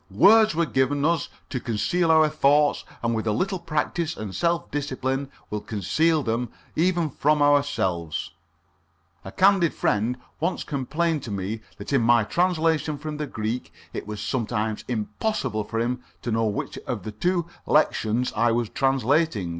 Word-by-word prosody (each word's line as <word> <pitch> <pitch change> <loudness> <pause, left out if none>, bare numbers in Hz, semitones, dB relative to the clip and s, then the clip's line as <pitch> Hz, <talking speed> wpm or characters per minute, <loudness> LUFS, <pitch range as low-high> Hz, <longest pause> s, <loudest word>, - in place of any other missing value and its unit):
Words 215 - +6
were 170 +1 +2
given 140 0 +1
us 165 -2 +1 0.2
to 130 - -1
conceal 165 +10 0
our 160 -1 +6
thoughts, 150 -1 +3 0.2
and 115 0 +1
with 110 0 -2
a - - +3
little 190 - -1
practice 160 +1 -2
and 105 -3 -5
self 170 - 0
discipline 135 -1 -2 0.2
will 105 0 -2
conceal 150 - +1
them 115 +1 -1 0.3
even 175 0 +2
from 150 +3 +2
ourselves. 140 - +1 0.9
A 95 - -8
candid 190 - +3
friend 115 +4 0 0.2
once 175 +4 -1
complained 155 +3 -1
to 120 - -7
me 100 +2 -3 0.2
that 105 +6 -6
in 135 - +4
my 120 0 +4
translation 160 - +1
from 150 +1 -5
the 150 -1 -3
Greek 110 +2 -4 0.2
it - - -5
was 105 -1 -5
sometimes 110 0 -2
impossible 115 - -2
for 115 - -4
him 120 +2 -1 0.2
to 120 - -2
know 115 0 +1
which 105 -2 -3
of - - -3
two 110 - -5 0.3
different 170 - -24
lectiones 125 -5 +2
I 115 +2 +3
was 115 -1 0
translating. 135 - +1
135 Hz, 160 wpm, -25 LUFS, 110-160 Hz, 0.9 s, Words